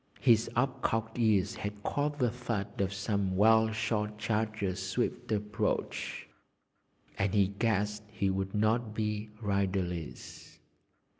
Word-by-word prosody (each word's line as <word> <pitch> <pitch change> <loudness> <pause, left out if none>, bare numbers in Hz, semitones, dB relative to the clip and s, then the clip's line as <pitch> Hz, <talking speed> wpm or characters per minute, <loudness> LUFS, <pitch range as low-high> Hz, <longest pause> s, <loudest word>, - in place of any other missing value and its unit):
His 115 -3 +4
up 130 +2 +1
cocked 110 +1 -1
ears 110 -2 +3
had 105 0 -5
caught 145 0 -1
the 125 -5 +2
thud 105 -5 -3
of 95 0 +1
some 100 -1 -1
well 110 +2 +5
shod 105 -1 -1
charger's 105 -3 -1
swift 95 +3 -2
approach, 105 0 -1 0.9
and 95 +1 +1
he 100 -2 +4
guessed 105 0 0
he 100 -2 0
would 95 +1 -2
not 110 +1 +1
be 105 -1 -2
riderless. 95 -5 -2
105 Hz, 125 wpm, -31 LUFS, 100-110 Hz, 0.9 s, well